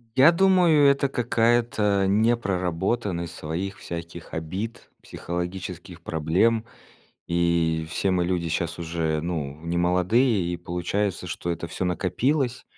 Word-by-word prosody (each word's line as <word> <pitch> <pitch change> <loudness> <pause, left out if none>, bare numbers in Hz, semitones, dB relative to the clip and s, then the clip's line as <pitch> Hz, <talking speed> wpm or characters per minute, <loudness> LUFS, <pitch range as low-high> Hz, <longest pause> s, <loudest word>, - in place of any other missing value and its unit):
Я 135 +6 +7
думаю, 175 -5 +5
это 140 0 +2
какая-то 115 -5 +2
непроработанность 95 -3 0
своих 90 +6 -4
всяких 85 0 -8
обид, 95 +8 -5
психологических 90 0 -6
проблем. 90 +9 +1 0.6
И 85 -2 +1
все 95 +3 0
мы 90 -1 +1
люди 85 -2 -1
щас 85 +1 -2
уже, 80 -2 -1
ну, 75 -4 -4
немолодые, 90 +4 +2
и - - -2
получается, 90 +3 -2
что 85 0 -4
это 85 0 -3
всё 90 - -4
накопилось. 125 - 0
90 Hz, 115 wpm, -25 LUFS, 85-115 Hz, 0.6 s, Я